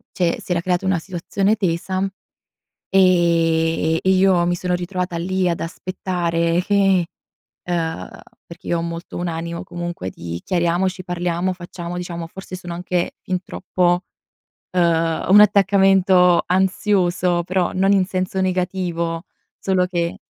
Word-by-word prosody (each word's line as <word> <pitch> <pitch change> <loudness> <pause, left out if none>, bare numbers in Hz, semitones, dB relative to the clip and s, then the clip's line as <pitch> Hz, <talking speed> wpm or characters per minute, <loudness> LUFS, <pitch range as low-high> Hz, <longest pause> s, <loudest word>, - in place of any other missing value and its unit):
Cioè 175 -2 0
si - - -4
era 170 - +1
creata 180 +2 -1
una 190 -2 +2
situazione 195 +4 -1
tesa, 185 -1 -1 0.9
ehm, 165 -3 +3
e 190 - +2
io 185 -2 +4
mi 175 - +1
sono 180 0 -1
ritrovata 180 0 -3
lì 185 +1 0
ad 170 - -2
aspettare 170 -1 -1
che 195 -3 +3 0.6
uhm, 165 -2 -2 0.4
perché 170 +1 -13
io 170 - +1
ho - - -2
molto 170 +1 -6
un 175 0 -2
animo 170 +1 -4
comunque 175 - -5
di 85 -1 -7
chiariamoci, 180 +1 0
parliamo, 175 0 -1
facciamo, 175 -1 -7
diciamo, 170 -1 -5
forse 185 +2 -9
sono 175 -2 -7
anche 175 0 -2
fin 185 -1 -2
troppo, 180 -1 0 0.7
uhm, 180 - +2 0.5
un 200 +2 +8
attaccamento 195 -3 +4
ansioso, 180 -2 +1
però, 180 +1 0
non 195 +1 +2
in 190 -2 +3
senso 185 0 -2
negativo, 180 -3 -1 0.4
solo 190 -2 +1
che 170 -2 -2
180 Hz, 135 wpm, -20 LUFS, 170-185 Hz, 0.9 s, un